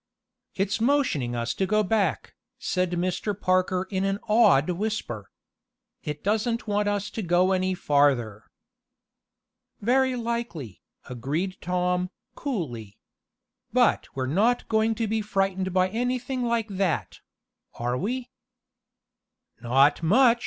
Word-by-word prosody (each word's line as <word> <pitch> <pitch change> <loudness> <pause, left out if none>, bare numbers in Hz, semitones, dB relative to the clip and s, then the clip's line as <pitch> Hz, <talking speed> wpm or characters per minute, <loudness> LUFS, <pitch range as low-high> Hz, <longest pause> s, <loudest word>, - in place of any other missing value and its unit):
"It's 200 +3 -1
motioning 230 - +1
us 120 +1 -1
to 190 - -1
go 215 +2 +2
back," 200 -4 0 0.2
said 185 -7 -1
Mr. 185 +3 -2
Parker 185 0 +1
in 190 -1 0
an 195 0 0
awed 210 -11 +5
whisper. 175 - -3 0.7
"It 150 -1 -5
doesn't 220 +3 0
want 205 0 +1
us 205 0 -1
to 225 - -4
go 180 0 +3
any 185 0 +1
farther." 135 - +1 1.3
"Very 260 +4 +2
likely," 230 - -4 0.3
agreed 150 +10 -3
Tom, 180 0 0 0.2
coolly. 120 - -4 0.8
"But - - +3
we're 130 -1 -1
not 210 - +1
going 220 0 +2
to 225 - -1
be 220 +1 0
frightened 195 -2 -1
by 185 0 +2
anything 250 +3 -2
like 230 -2 0
that; 190 -4 -1 0.6
are 120 +1 -2
we?" 245 - -3 1.3
"Not 135 +6 +3
much!" 235 +8 +5
190 Hz, 120 wpm, -26 LUFS, 160-220 Hz, 1.3 s, awed